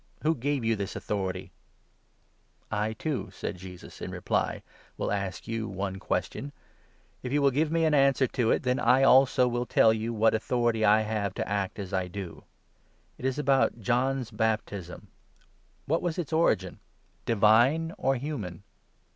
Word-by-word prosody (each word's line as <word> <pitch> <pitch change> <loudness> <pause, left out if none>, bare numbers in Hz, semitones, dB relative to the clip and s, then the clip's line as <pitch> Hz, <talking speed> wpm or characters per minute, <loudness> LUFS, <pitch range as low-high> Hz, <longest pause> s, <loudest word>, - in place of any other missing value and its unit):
Who 160 +2 +3
gave 140 -2 -2
you 115 0 +2
this 100 -1 -4
authority? 95 -3 -3 0.4
" - - -41
" - - -41 0.3
I, 105 +1 -1
too," 145 +5 -3
said 90 - -6
Jesus 90 -1 -11
in - - -4
reply, - - -2 0.2
" - - -29
will - - -2
ask 100 -5 -3
you 115 -1 -3
one 95 0 -4
question; 140 +7 -3 0.7
if 125 - -5
24 - - -4
you 145 - +3
will 140 - +5
give 150 +4 +1
me 165 0 +2
an 155 - +2
answer 135 -2 +4
to 120 -2 0
it, - - +2
then 125 0 +1
I, 130 +2 +4
also, 130 -1 +5
will 120 0 -2
tell 110 - +5
you 110 +1 -2
what 110 0 +3
authority 115 0 0
I 105 +1 +5
have 105 -3 -2
to - - -3
act 100 -1 -2
as 100 -2 -6
I 95 -1 0
do. 90 -4 -8 0.7
It - - -6
is 130 0 0
about 135 -4 +2
John's 125 +3 0
25 - - -15
baptism. 105 -5 -2 0.8
What 165 +4 0
was 175 -3 -2
its 165 -3 -4
origin? 95 - +1 0.5
divine 120 - +4
or 135 0 +2
human 115 - -5
115 Hz, 180 wpm, -28 LUFS, 100-135 Hz, 0.8 s, will